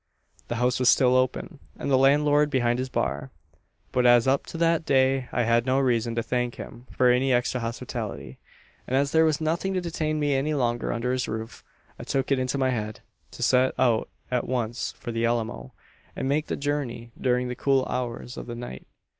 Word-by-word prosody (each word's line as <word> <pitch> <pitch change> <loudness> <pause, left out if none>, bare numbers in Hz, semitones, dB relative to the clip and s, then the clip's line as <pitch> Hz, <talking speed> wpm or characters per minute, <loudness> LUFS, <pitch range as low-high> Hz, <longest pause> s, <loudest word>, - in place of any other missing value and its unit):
"The 120 - -3
house 125 +2 +1
was 125 - +4
still 125 -1 +4
open, 130 +5 -1 0.2
and 140 - -3
the - - +5
landlord 145 +2 +4
behind 120 -3 +1
his 130 0 -3
bar; 65 - -2 0.6
but 125 - +1
as 120 0 +5
up 135 +1 +1
to - - -7
that 165 0 +2
day 130 -2 +2
I 120 - +1
had 115 +2 +2
no 130 +1 +2
reason 120 -3 +1
to 115 - 0
thank 125 0 -1
him 120 +2 -10
for 125 -1 +3
any 130 +2 +2
extra 125 +1 +1
hospitality, 115 - -5 0.5
and 130 - -1
as 140 +1 +1
there 160 0 +4
was 155 -2 +1
nothing 170 +5 -1
to - - +2
detain 155 -3 -2
me 145 -1 +1
any 145 +3 0
longer 120 -3 0
under 120 +1 -1
his 130 0 -1
roof, 110 +1 -6 0.4
I - - -6
took 135 +1 -1
it 135 - +3
into 130 +2 -1
my 130 -1 +1
head 110 -3 -4 0.3
to - - -6
set 130 0 +3
out 115 -3 +2 0.2
at 125 - 0
once 120 -2 -2
for 120 - -7
the 115 0 -2
Alamo, 120 +2 -2 0.4
and 130 - -3
make 150 +3 0
the - - -2
journey 135 -5 -3
during 125 0 +1
the 125 - -4
cool 135 0 +2
hours 125 0 -4
of - - -7
the 120 - -5
night. 120 - -8
125 Hz, 205 wpm, -26 LUFS, 120-140 Hz, 0.6 s, the